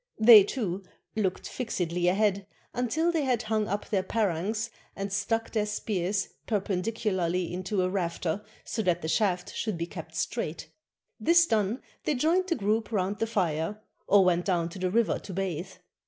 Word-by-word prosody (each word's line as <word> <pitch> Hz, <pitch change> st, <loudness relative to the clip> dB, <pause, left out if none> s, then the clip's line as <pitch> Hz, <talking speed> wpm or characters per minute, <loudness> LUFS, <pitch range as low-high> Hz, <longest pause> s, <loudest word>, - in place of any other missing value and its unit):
They, 220 Hz, -2 st, +10 dB
too, 200 Hz, -4 st, -3 dB, 0.3 s
looked 195 Hz, -4 st, -1 dB
fLxedly 180 Hz, -7 st, -1 dB
ahead, 200 Hz, 0 st, +1 dB, 0.3 s
until 275 Hz, +8 st, +1 dB
they 330 Hz, -2 st, +1 dB
had 250 Hz, -3 st, +1 dB
hung 215 Hz, -1 st, 0 dB
up 205 Hz, 0 st, -3 dB
their 195 Hz, -3 st, +1 dB
parangs 215 Hz, +3 st, -1 dB, 0.2 s
and 195 Hz, 0 st, -4 dB
stuck 225 Hz, +3 st, 0 dB
their 215 Hz, -2 st, 0 dB
spears 200 Hz, -2 st, -1 dB, 0.2 s
perpendicularly 190 Hz, -4 st, -1 dB
into 185 Hz, +1 st, -1 dB
a -, -, +2 dB
rafter 180 Hz, 0 st, -2 dB, 0.2 s
so 220 Hz, -, -2 dB
that 175 Hz, -4 st, +1 dB
the -, -, -2 dB
shaft 180 Hz, 0 st, 0 dB
should 215 Hz, -6 st, -2 dB
be 165 Hz, -, -2 dB
kept -, -, -9 dB
straight; -, -, -3 dB, 0.5 s
this 340 Hz, 0 st, +5 dB
done, 220 Hz, -2 st, 0 dB, 0.2 s
they 300 Hz, -, +1 dB
joined 335 Hz, +8 st, +2 dB
the 340 Hz, -, +1 dB
group 220 Hz, +1 st, 0 dB
round 200 Hz, 0 st, -1 dB
the 225 Hz, -, 0 dB
fire, 185 Hz, -2 st, -1 dB, 0.3 s
or 200 Hz, -1 st, +6 dB
went 175 Hz, -1 st, +2 dB
down 170 Hz, -3 st, +1 dB
to 185 Hz, -, -9 dB
the 185 Hz, 0 st, 0 dB
river 230 Hz, +4 st, +2 dB
to 195 Hz, -, -9 dB
bathe. 185 Hz, -2 st, -2 dB
200 Hz, 170 wpm, -28 LUFS, 180-225 Hz, 0.5 s, They